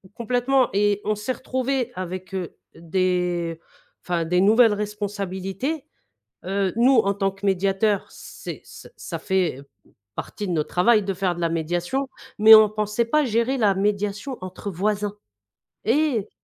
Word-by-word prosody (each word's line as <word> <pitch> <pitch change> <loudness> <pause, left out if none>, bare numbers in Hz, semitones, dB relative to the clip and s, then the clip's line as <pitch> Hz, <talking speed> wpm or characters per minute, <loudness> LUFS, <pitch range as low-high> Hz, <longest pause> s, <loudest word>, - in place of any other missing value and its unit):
Complètement 245 +3 +1
et 205 0 +2
on 215 0 +1
s'est 210 +5 -3
retrouvés 260 0 -2
avec, 185 +1 -6
heu, 185 -3 -4 0.2
des 175 -1 -1 0.4
enfin 170 -2 -1
des 180 +2 +2
nouvelles 220 +2 +5
responsabilités. 205 - -4 0.6
Heu, 195 -1 -1
nous 245 +2 +4
en 200 -2 +3
tant 195 -1 0
que 195 +1 -9
médiateurs 195 +2 +1
c'est - - -9
ç - - -12
ça - - -6
fait 185 -8 0 0.5
partie 205 - -5
de 180 - -1
notre 150 -2 -1
travail 210 +3 +3
de 195 - -2
faire 185 -1 -1
de 175 - -6
la 170 - +1
médiation, 175 - -2 0.3
mais 220 +1 +10
on 215 -1 +7
pensait 215 +2 -1
pas 300 +5 +2
gérer 235 +3 0
la 210 -5 +3
médiation 205 +5 -1
entre 185 +2 -6
voisins 205 +3 -1 0.7
et 240 -3 +1
205 Hz, 150 wpm, -23 LUFS, 185-225 Hz, 0.7 s, mais